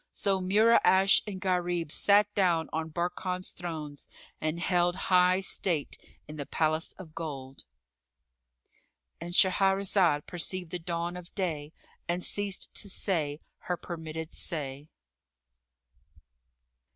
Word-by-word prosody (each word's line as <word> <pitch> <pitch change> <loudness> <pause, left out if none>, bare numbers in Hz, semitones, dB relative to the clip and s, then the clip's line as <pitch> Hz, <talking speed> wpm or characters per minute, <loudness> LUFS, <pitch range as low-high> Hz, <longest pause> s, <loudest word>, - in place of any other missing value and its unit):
So 195 -1 0
Mura'ash 195 -1 +5
and 195 -3 -5
Gharib 175 -4 -1
sat 205 +4 +5
down 170 -5 +1
on 160 0 -2
Barkan's 180 +2 -2
thrones 155 -4 -7 0.3
and 155 +2 -1
held 175 0 +2
high 185 0 +3
state 170 -5 -1 0.3
in 155 0 -9
the 145 - -5
Palace 155 +1 0
of 170 -5 -12
Gold.— 135 -5 -7 1.5
And 175 +1 -6
Shahrazad 190 -5 +3
perceived 180 0 -3
the 180 - -3
dawn 170 +1 -3
of 180 -1 -11
day 160 -6 -2 0.4
and 175 +1 -1
ceased 205 -2 -1
to 205 - -4
say 155 -7 -1 0.2
her 180 - -1
permitted 160 -2 -6
say. 145 -3 -3
175 Hz, 115 wpm, -29 LUFS, 160-185 Hz, 1.5 s, Mura'ash